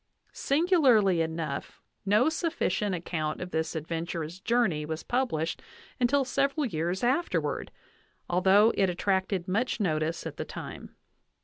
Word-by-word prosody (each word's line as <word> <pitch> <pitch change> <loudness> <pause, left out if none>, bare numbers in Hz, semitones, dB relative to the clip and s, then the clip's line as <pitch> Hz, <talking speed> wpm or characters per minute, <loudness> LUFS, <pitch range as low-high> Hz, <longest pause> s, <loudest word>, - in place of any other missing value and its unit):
Singularly 270 - +3
enough, 160 -3 -4 0.3
no 210 +7 +4
sufficient 315 - 0
ac 170 - -6
count 155 -3 -2
of 180 0 -6
this 160 +1 -2
adventurous 165 +1 -4
journey 210 -8 +1
was 160 +1 -5
published 170 -11 -1 0.4
until 265 +3 +3
several 275 +3 0
years 175 -1 -2
afterward, 270 +8 0 0.6
although 190 +5 +4
it 195 -2 +2
attracted 190 0 0
much 225 +8 0
notice 160 -4 -1
at - - -6
the - - -2
time. - - -8
190 Hz, 125 wpm, -28 LUFS, 165-245 Hz, 0.6 s, no